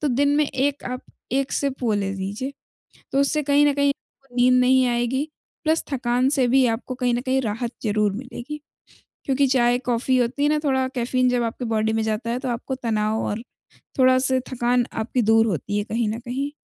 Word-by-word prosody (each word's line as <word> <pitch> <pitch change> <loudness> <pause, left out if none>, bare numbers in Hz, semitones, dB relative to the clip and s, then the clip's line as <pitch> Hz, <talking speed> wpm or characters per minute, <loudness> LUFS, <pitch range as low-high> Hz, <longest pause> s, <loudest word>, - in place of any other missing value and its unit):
तो 300 - 0
दिन 285 +3 +2
में 300 0 +3
1 280 +1 -1
आप 250 0 -4 0.3
1 270 0 0
सिप 275 -2 -2
वो 225 -3 +2
ले 200 -1 -1
लीजिए, 200 +8 -4 0.6
तो 275 - +3
उससे 300 +2 +1
कहीं 285 +1 +4
न 290 - +4
कहीं 285 0 +2
आपको 270 -2 -11
वो - - -11
नींद 250 0 +5
नहीं 260 +1 +4
आएगी, 240 +3 0 0.4
प्लस 320 +1 +1
थकान 250 0 +1
से 260 -2 +3
भी 265 +2 +4
आपको 235 +2 -2
कहीं 250 -1 0
न 240 - 0
कहीं 265 0 +1
राहत 230 +1 -2
ज़रूर 210 -2 +1
मिलेगी। 255 +6 -7 0.6
क्योंकि 275 +1 +2
चाय-कॉफ़ी 245 0 +2
होती 245 +3 0
है 290 - +4
ना, 305 0 +2
थोड़ा 265 -2 +2
कैफ़ीन 255 +1 +1
जब 245 -1 +1
आपके 230 +2 -4
बॉडी 220 0 +1
में 225 - +1
जाता 220 +1 -2
है, 240 - -1
तो 265 - -4
आपको 245 +2 -3
तनाव 220 -3 -1
और 210 +2 -2 0.6
थोड़ा-सा 255 0 +4
थकान 245 0 +1
आपकी 235 +3 -1
दूर 225 +1 +4
होती 205 +1 -2
है 205 - -1
कहीं 225 +1 -1
न 220 +2 -3
कहीं। 260 +4 -3
250 Hz, 205 wpm, -23 LUFS, 230-270 Hz, 0.6 s, नींद